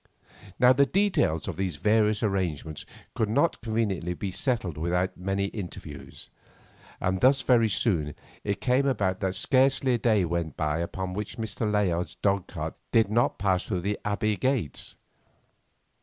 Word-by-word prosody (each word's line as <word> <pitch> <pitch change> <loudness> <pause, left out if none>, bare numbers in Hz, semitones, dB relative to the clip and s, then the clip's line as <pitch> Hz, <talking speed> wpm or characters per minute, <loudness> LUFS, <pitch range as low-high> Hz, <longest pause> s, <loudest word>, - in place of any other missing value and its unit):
Now 125 +1 +6
the 140 +2 +4
details 185 - +1
of - - -4
these 95 -2 -2
various 105 0 +2
arrangements 85 -7 -2 0.3
could 110 -2 0
not 145 +9 +1
conveniently 105 -7 -1
be 95 +2 -4
settled 95 - -1
without 90 +4 -1
many 95 +2 -1
interviews, 85 -8 -8 0.7
and 95 0 -1
thus 135 +1 +4
very 115 -3 +4
soon 85 - 0 0.3
it 100 -1 -2
came 130 +2 +2
about 95 -8 0
that 95 0 -1
scarcely 130 +4 +3
a - - +3
day 110 -6 +3
went 85 -2 -3
by 75 +1 0
upon 90 +2 -3
which 105 +2 -5
Mr. 110 -1 -2
Layard's 90 -4 0
dog 100 -2 0
cart - - -5 0.2
did 110 -3 +3
not 120 +2 +2
pass 95 -2 0
through 90 -4 -1
the 100 +3 -2
Abbey 105 0 0
gates. 130 - -2
100 Hz, 155 wpm, -27 LUFS, 90-115 Hz, 0.7 s, Now